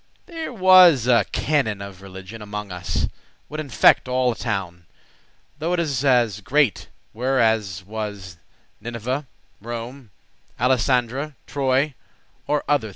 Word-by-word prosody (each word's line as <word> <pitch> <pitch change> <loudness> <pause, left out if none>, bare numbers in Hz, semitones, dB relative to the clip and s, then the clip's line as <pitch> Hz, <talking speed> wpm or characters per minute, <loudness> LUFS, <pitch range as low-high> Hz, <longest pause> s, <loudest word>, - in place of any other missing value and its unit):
There 330 -4 -6
was 185 - +6
a 120 -5 +4
canon 135 -9 0
of 100 -2 -9
religioun 95 +3 -10
Amonges 105 -1 -6 0.3
us, - - +1 0.4
would 155 - -6
infect* 140 -3 +3
all 125 0 +1
a - - -5
town, 95 -7 -4
*deceive 150 - -36
Though 165 +3 -1
it 180 - +1
as 130 - +1
great 145 -4 +1 0.2
were 130 +4 0
as 105 -5 +1
was 100 -4 -6 0.4
Nineveh, 120 +4 -4 0.3
Rome, 120 +2 -7 0.5
Alisandre,* 130 +3 +1
Troy, 135 +1 0 0.5
or 150 0 0
other 145 -7 +1
three. - - -9
120 Hz, 130 wpm, -22 LUFS, 105-140 Hz, 0.5 s, was